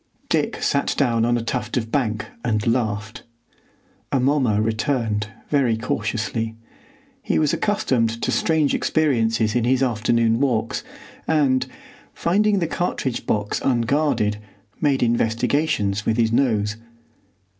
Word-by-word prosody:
Dick - - 0
sat - - +1
down 115 -1 +2
on 120 0 +2
a 115 - -3
tuft 125 +3 -2
of 115 -2 -3
bank 110 -6 0 0.2
and 110 -3 0
laughed. 110 -3 -1 0.9
Amomma 130 -5 +2
returned 110 -1 0 0.2
very 130 -6 +2
cautiously. 115 0 -2 0.7
He - - 0
was 150 -2 +2
accustomed 130 - +1
to - - +1
strange 160 -3 +2
experiences 115 -8 +1
in 120 - +1
his 130 +2 +2
afternoon 115 -1 +1
walks, 120 -5 0 0.4
and, 135 -5 +2 0.5
finding 205 +4 +2
the 175 - +1
cartridge 155 -6 -2
box 105 -1 -1
unguarded, 120 -4 +1 0.4
made 140 -4 +2
investigations 115 -1 +1
with 110 +1 0
his 115 -2 +2
nose. 110 -4 +1
120 Hz, 120 wpm, -22 LUFS, 110-140 Hz, 0.9 s, down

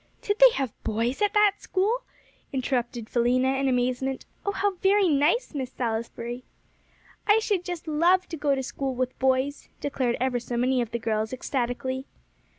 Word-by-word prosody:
"Did 410 +1 -1
they - - +10
have 265 -5 -2
boys 230 - -1
at 415 0 +2
that 415 -1 +5
school?" 420 +6 0 0.5
interrupted 245 -3 -2
Philena, 255 +3 +2
in 275 - +1
amazement. 255 +1 0 0.2
"Oh, 405 - 0
how 405 0 +1
very 390 +1 +4
nice, 310 - +2
Miss 260 -3 -4
Salisbury!" 235 +1 -4 0.8
"I 415 +1 +6
should 415 -5 0
just 355 -2 -6
love 345 +4 +3
to 330 - -4
go 285 -2 +1
to 265 - -3
school 265 0 -3
with 255 0 -2
boys," 265 +2 0
declared 260 -4 -1
ever 250 -1 +1
so 240 0 -4
many 255 +1 +2
of 235 - -3
the 235 - -2
girls 220 0 -1
ecstatically. 260 +1 -2
265 Hz, 165 wpm, -26 LUFS, 245-345 Hz, 0.8 s, they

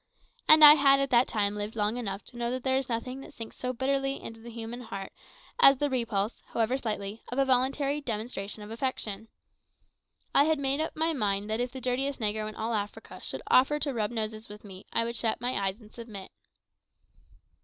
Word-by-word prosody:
And 310 0 +8
I 295 - +13
had 275 -2 +5
at 275 0 -1
that 240 +1 +5
time 205 -2 0
lived 210 +1 -5
long 210 +1 0
enough 205 -5 -4
to 245 - -12
know 240 0 -2
that 255 0 -3
there 260 -1 +1
is 265 -1 -3
nothing 250 +3 -3
that - - -13
sinks 230 -2 -8
so 250 - -3
bitterly 270 +2 -1
into 225 0 -9
the 235 - -10
human 230 +1 -7
heart 195 -5 -7 0.5
as 275 - +8
the 290 +1 -1
repulse, 230 -4 -1
however 230 +2 0
slightly, 215 -4 -4
of 245 - -6
a 275 - +3
voluntary 275 +3 +1
demonstration 215 -4 -4
of 210 - -10
affection. 225 -3 -3 1.1
I 280 - +6
had 315 0 +2
made 280 +1 0
up 315 - -3
my 320 +1 +1
mind 205 -5 -1
that 220 - 0
if 245 0 -1
the 260 - -7
dirtiest 260 +2 -1
negro 215 -1 -1
in 215 - -11
all 225 +1 -2
Africa 205 -1 -5
should - - -6
offer 270 +4 +4
to 290 -2 -1
rub 215 -3 -1
noses 220 -1 -4
with 210 0 -11
me, 195 -2 -12
I 230 - +2
would 235 +1 -3
shut 225 -1 0
my 245 +1 -1
eyes 195 +3 -3
and 215 -2 -17
submit. 220 -5 -9
235 Hz, 210 wpm, -28 LUFS, 215-265 Hz, 1.1 s, I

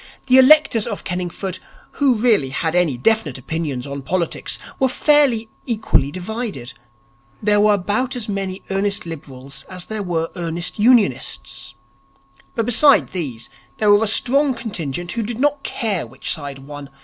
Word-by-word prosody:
The 260 0 +6
electors 260 -5 +5
of 205 -4 -5
Kenningford 180 +1 -4 0.3
who 275 -4 +2
really 215 - +2
had 160 +4 -2
any 175 -7 +2
definite 160 - +1
opinions 140 -2 -4
on 140 0 -6
politics 170 +5 -2 0.2
were 265 - +4
fairly 265 -5 +3 0.2
equally 215 - +1
divided. 185 - -5 0.7
There 205 0 +2
were 210 0 +5
about 210 +7 -1
as 240 -3 -4
many 195 -2 -4
earnest 200 0 0
Liberals 140 -4 -8
as 180 -1 -6
there 220 -1 -4
were 165 -4 -1
earnest 170 +3 -3
Unionists. 135 - +1 0.8
But 230 - 0
besides 260 +5 +4
these 135 -11 -4 0.3
there 210 -1 +3
was 205 +1 +6
a 225 - +1
strong 270 +3 +2
contingent 175 - -4
who 235 - -2
did 225 +2 -4
not 290 0 +1
care 215 -9 -2
which - - -4
side 145 -3 -7
won. 140 +1 -10
195 Hz, 150 wpm, -20 LUFS, 160-230 Hz, 0.8 s, The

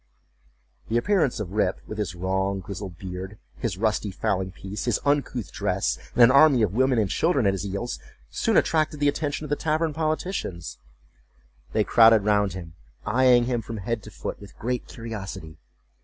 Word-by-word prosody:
The 115 - +2
appearance 160 - +1
of 100 -4 -4
Rip, 100 -2 0
with 110 - -7
his 90 -5 -2
long 95 +2 -1
grizzled 95 -1 -7
beard, 95 +3 -7 0.2
his 110 -7 -3
rusty 110 0 0
fowling 95 0 -1
piece, 95 +2 -6
his 120 -4 +1
uncouth 140 -6 0
dress, - - -1 0.2
and 125 - +7
an 120 - +8
army 140 -3 +6
of 100 -3 0
women 130 +2 +2
and 110 -3 +2
children 140 - +1
at 100 - +3
his 95 - -3
heels, 100 +5 -4 0.3
soon - - +1
attracted 155 -2 +2
the 145 - +2
attention 145 +1 -1
of 150 - -7
the - - +3
tavern 155 +1 0
politicians. 155 - -3 0.9
They 110 - +3
crowded 115 -1 +6
round 105 -3 +2
him, 85 -4 -8 0.3
eyeing 125 +2 +4
him 120 -1 -1
from 115 +1 -7
head 110 +3 -3
to - - -11
foot - - -6
with 100 - -13
great 125 +1 -3
curiosity. 95 -8 -7
110 Hz, 175 wpm, -25 LUFS, 95-130 Hz, 0.9 s, an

